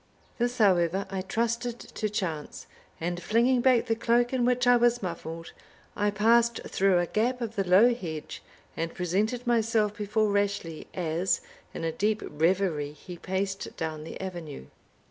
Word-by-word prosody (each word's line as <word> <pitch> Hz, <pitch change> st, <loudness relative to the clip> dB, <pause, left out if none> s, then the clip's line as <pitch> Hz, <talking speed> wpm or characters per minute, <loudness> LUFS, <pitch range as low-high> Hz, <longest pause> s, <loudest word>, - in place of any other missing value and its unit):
This, 240 Hz, +1 st, 0 dB
however, 190 Hz, -3 st, +3 dB
I 190 Hz, -1 st, -2 dB
trusted 230 Hz, +4 st, -1 dB
to 215 Hz, -, -4 dB
chance; 170 Hz, -8 st, -4 dB, 0.3 s
and 175 Hz, +1 st, -3 dB
flinging 240 Hz, +5 st, +3 dB
back 250 Hz, -2 st, +4 dB
the 230 Hz, -, +1 dB
cloak 240 Hz, +2 st, +1 dB
in 250 Hz, -2 st, +2 dB
which 250 Hz, 0 st, +2 dB
I 245 Hz, 0 st, +6 dB
was 240 Hz, -1 st, +3 dB
muffled, 165 Hz, -2 st, -6 dB, 0.4 s
I 205 Hz, 0 st, +1 dB
passed 230 Hz, +3 st, +3 dB
through 195 Hz, -1 st, +2 dB
a 175 Hz, -, +2 dB
gap 240 Hz, +7 st, 0 dB
of 230 Hz, -2 st, -4 dB
the 195 Hz, -, +1 dB
low 220 Hz, +7 st, +6 dB
hedge, 160 Hz, -9 st, -6 dB, 0.3 s
and 165 Hz, 0 st, -3 dB
presented 210 Hz, +8 st, -1 dB
myself 225 Hz, -3 st, +2 dB
before 210 Hz, 0 st, 0 dB
Rashleigh, 200 Hz, -5 st, -1 dB
as, 175 Hz, -, 0 dB, 0.3 s
in -, -, -6 dB
a 165 Hz, -, 0 dB
deep 210 Hz, +5 st, 0 dB
reverie, 160 Hz, -2 st, 0 dB
he 175 Hz, +4 st, -10 dB
paced 190 Hz, +2 st, -3 dB
down 160 Hz, -2 st, -4 dB
the 160 Hz, -, -8 dB
avenue. 175 Hz, -, -6 dB
200 Hz, 160 wpm, -28 LUFS, 175-235 Hz, 0.4 s, I